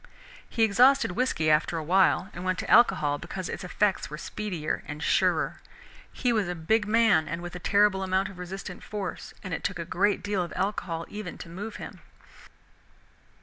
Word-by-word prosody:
He 225 - +1
exhausted 235 +1 +5
whisky 180 -8 +1
after 155 +2 +2
a 160 - -3
while, 190 +3 +3
and 175 - -7
went 185 0 0
to - - -4
alcohol, 150 -11 +4
because 180 +2 -5
its 195 - -5
effects 190 +2 0
were 150 - -6
speedier 175 -3 -4
and 150 +1 -6
surer. - - +1 0.5
He 245 -2 0
was 215 -5 +1
a 180 - -2
big 205 +6 +1
man 215 -7 +4
and 170 +3 -3
with 175 0 -7
a - - -5
terrible 200 +1 +3
amount 190 0 +1
of 195 -3 -11
resistant 180 0 -7
force, 205 -3 -6
and 185 -4 -5
it - - -3
took 185 - -2
a 170 - -4
great 200 +5 +1
deal 205 -2 0
of 175 - -4
alcohol 180 -4 -2
even 205 -4 -7
to - - -9
move 205 +6 -6
him. - - -9
185 Hz, 190 wpm, -27 LUFS, 170-210 Hz, 0.5 s, exhausted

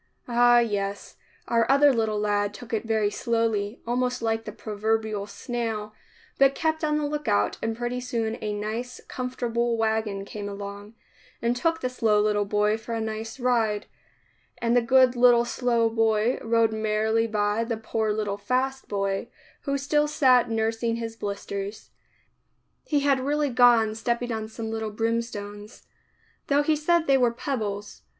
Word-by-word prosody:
Ah, 240 0 +5
yes, 205 -4 -1 0.3
our 230 0 +2
other 280 +1 +6
little 220 -3 0
lad 205 -1 0
took 230 +3 -10
it 225 +1 -1
very 215 -2 +1
slowly, 225 -2 -1
almost 250 +1 0
like 225 -1 -1
the 210 - -5
proverbial 215 -1 -2
snail, 215 0 -4 0.5
but 275 0 +5
kept 315 -1 -1
on 300 -1 +1
the 300 - -1
lookout 290 - 0
and 225 0 -2
pretty 240 +1 -2
soon 230 -3 -2
a 210 - -2
nice, 220 +4 -4
comfortable 240 -2 -2
wagon 220 -3 -1
came 205 0 -6
along, 200 +2 -8 0.4
and 235 +1 0
took 325 +6 0
the - - 0
slow 225 -4 +2
little 210 -1 +1
boy 210 +2 +1
for 230 +1 -5
a - - -2
nice 220 +2 -5
ride, 230 -4 +1 0.7
and 235 0 +1
the 245 - +5
good 255 +1 +4
little 240 -1 +5
slow 240 -1 +1
boy 225 +1 +1
rode 225 -1 +2
merrily 220 +1 +1
by 210 0 0
the 230 -1 -3
poor 220 0 -1
little 210 -1 -2
fast 265 +4 -1
boy, 195 -1 -1 0.4
who 280 -1 0
still 295 +2 +1
sat 255 -5 +4
nursing 225 +1 0
his 230 -1 -5
blisters. 200 -1 -5 0.9
He 290 -2 +1
had 280 -1 +3
really 290 +2 0
gone 240 -3 +5
stepping 235 +2 -2
on 220 -1 -3
some 220 0 -6
little 220 -1 -3
brimstones, 210 -1 -4 0.3
— - - -38
though 285 +1 +3
he 310 +1 +2
said 325 +2 +2
they 275 -2 +4
were 245 -1 +4
pebbles. 210 -5 -4
225 Hz, 160 wpm, -26 LUFS, 210-245 Hz, 0.9 s, other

